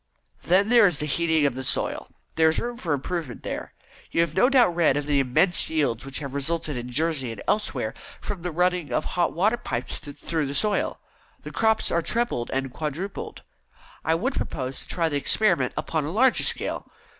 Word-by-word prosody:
"Then 195 +4 +3
there 235 -3 +7
is 175 -6 +1
the 150 - -2
heating 160 0 +2
of 140 - +2
the 130 +1 -5
soil. - - 0 0.2
There 160 0 +4
is 160 - 0
room 240 0 -4
for 170 -9 -4
improvement 145 -2 -3
there. - - -5 0.3
You 165 - +2
have 170 -2 0
no 245 - +4
doubt 245 -11 +4
read 165 -5 +3
of 145 - -2
the 145 -1 +2
immense 135 +7 +3
yields 145 -8 0
which 135 0 -5
have 140 -3 -6
resulted 150 +1 -2
in 120 0 -5
Jersey 145 -2 0
and 115 - -8
elsewhere, 210 - 0 0.3
from 200 -4 -5
the 180 - -3
running 180 -1 0
of - - 0
hot 175 -2 0
water 210 +8 +2
pipes 125 - -4
through 150 +1 -3
the 140 - -4
soil. 210 +3 +1 0.4
The - - -7
crops 220 -1 +2
are 170 - +2
trebled 225 - -1
and 135 -1 -2
quadrupled. 160 +8 -5 0.6
I 160 - +2
would 255 +11 -1
propose 130 - -4
to - - -10
try 170 -2 0
the 145 -3 -1
experiment 170 - +2
upon 160 -2 -1
a 150 - -3
larger 245 +6 +3
scale. - - -2
160 Hz, 200 wpm, -25 LUFS, 140-180 Hz, 0.6 s, there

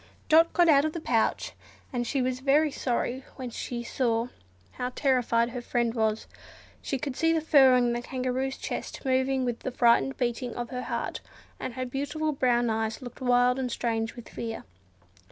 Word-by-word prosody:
Dot 325 +1 +6
got 350 -1 +4
out 285 -3 +6
of 310 0 -1
the 335 - -4
pouch, 230 -7 0 0.4
and 240 -1 -1
she 270 0 0
was 255 0 -1
very 285 +3 +3
sorry 255 0 -2
when 255 -3 -6
she 240 +1 -5
saw 235 -1 0 0.4
how 250 - -3
terrified 245 -3 +2
her 245 - -5
friend 240 -1 -1
looked. 220 -1 0 0.6
She 270 - -2
could 260 0 -4
see 325 +3 +2
the 325 - +2
fur 280 -5 +6
on 245 -1 +2
the 240 - -2
Kangaroo's 255 +1 -2
chest - - -6
moving 260 0 +1
with 240 -1 -2
the - - -4
frightened 245 +2 +3
beating 245 -1 -2
of 240 -1 -5
her 250 -1 -3
heart; - - -3 0.4
and 240 - -5
her 255 0 -2
beautiful 285 +4 -2
brown 245 -4 +2
eyes 220 +3 -2
looked 245 +1 -10
wild 250 0 +3
and 255 -2 -2
strange 225 -1 -2
with 240 -3 -10
fear. 225 -1 -5
250 Hz, 185 wpm, -27 LUFS, 240-270 Hz, 0.6 s, Dot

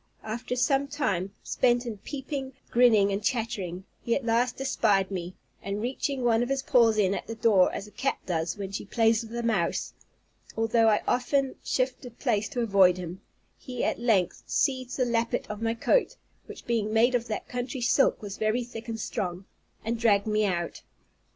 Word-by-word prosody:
After 235 +3 -4
some 270 +2 +2
time 200 - -1
spent 245 -1 +2
in 220 -4 -5
peeping, 270 +1 -5 0.2
grinning, 220 -5 +5
and 200 +1 -2
chattering, 210 -7 -2 0.2
he 235 - 0
at 270 - -3
last 235 +2 +1
espied 205 -7 +1
me; 180 -1 -5 0.3
and 200 +1 -3
reaching 260 +3 -2
one 230 -1 +3
of 245 - -1
his 275 0 0
paws 230 -5 +4
in 195 -2 +3
at - - -4
the 225 - -5
door, 210 -5 +4
as 195 - -5
a 210 - -14
cat 250 +6 -1
does 165 +1 -2
when 195 -1 -5
she 195 - -4
plays 225 +1 +2
with 230 0 -8
a 235 - -2
mouse, 205 -7 0 0.6
although 225 0 +3
I 210 - +2
often 265 +1 +1
shifted 255 -2 -2
place 210 -5 0
to 245 - -2
avoid 195 -5 +4
him, 180 +1 -7 0.4
he 250 -2 -5
at - - 0
length 220 -7 +1
seized 260 -3 0
the 255 - +2
lappet 230 -1 0
of 210 +1 -7
my 225 0 0
coat 480 - +2 0.3
(which - - -10
being 225 -3 0
made 230 +3 +4
of 240 -1 0
that 215 - -4
country 250 +2 -4
silk, 240 -1 +3
was 200 -1 -6
very 220 +3 0
thick 235 -1 -9
and 225 -1 -4
strong), 185 -3 -3 0.4
and 230 +1 -1
dragged 205 -4 +3
me 215 0 +1
out. 175 -3 -2
225 Hz, 190 wpm, -27 LUFS, 200-245 Hz, 0.6 s, grinning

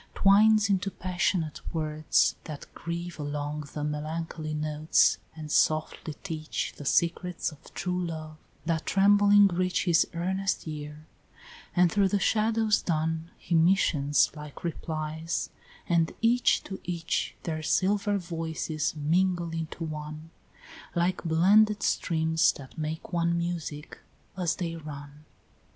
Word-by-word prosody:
Twines 215 +2 +5
into 195 -1 +1
passionate 180 -4 -1
words 155 -1 +2
that 150 -2 -7
grieve 170 0 -5
along 145 +1 -3
The 150 - -4
melancholy 155 +1 -3
notes, 155 +1 +2 0.2
and 155 -2 -7
softly 155 0 +1
teach 155 -5 -3
The 145 - -9
secrets 170 +3 0
of 150 - -16
true 180 0 -1
love, 155 -1 -7 0.3
that 160 -1 -1
trembling 205 +1 +6
reach 180 +1 0
His 170 -3 +4
earnest 190 +2 -1
ear, 150 0 -7 0.7
and 175 -1 +4
through 200 -1 +3
the 200 +1 +1
shadows 220 0 +2
dun 160 0 -1
He - - -5
missions 160 -4 +3
like 150 -1 -10
replies, 160 -1 -3 0.4
and 165 -2 +2
each 240 +2 +3
to 190 - -7
each 170 -2 -2
Their 155 -2 -3
silver 200 +6 +1
voices 165 -3 -3
mingle 170 +3 +1
into 165 0 -5
one, 155 0 -6 0.6
Like 175 +1 0
blended 200 +6 +4
streams 160 -1 +2
that 135 -2 -12
make 160 +3 -5
one 170 0 +1
music 170 -3 -4 0.4
as 180 -4 0
they 170 -3 -3
run. 150 -1 -9
165 Hz, 125 wpm, -28 LUFS, 155-185 Hz, 0.7 s, trembling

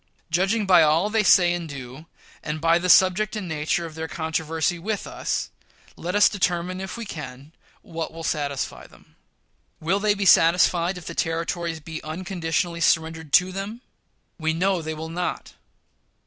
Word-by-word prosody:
Judging 195 +6 +1
by 180 -3 +6
all 160 +6 +3
they 220 0 +3
say 180 -3 +5
and 170 -2 -4
do, 135 +2 -9 0.3
and 155 0 -4
by 165 +2 +3
the 180 +1 -2
subject 190 +5 +4
and 205 -4 -4
nature 160 +1 -1
of 165 - -8
their 160 0 -5
controversy 160 +1 -2
with 210 +3 -3
us, - - -3 0.4
let 180 +3 -4
us 205 - +6
determine, 185 -2 -1
if 190 +3 -6
we 230 - -5
can, 140 -5 -8 0.3
what 165 -1 -5
will 165 0 -9
satisfy 140 -3 -3
them. - - -22 0.6
Will 180 +6 0
they 205 0 +2
be 200 -1 -2
satisfied 175 +1 +4
if 180 - -10
the 170 - -6
Territories 165 0 -2
be 160 +1 -8
unconditionally 170 0 -3
surrendered 160 -1 +1
to 180 +1 +5
them? 200 +5 -6 0.6
We 160 0 0
know 185 +1 +1
they 160 0 -4
will 160 +1 -6
not. 175 +2 -4
170 Hz, 165 wpm, -24 LUFS, 160-185 Hz, 0.6 s, by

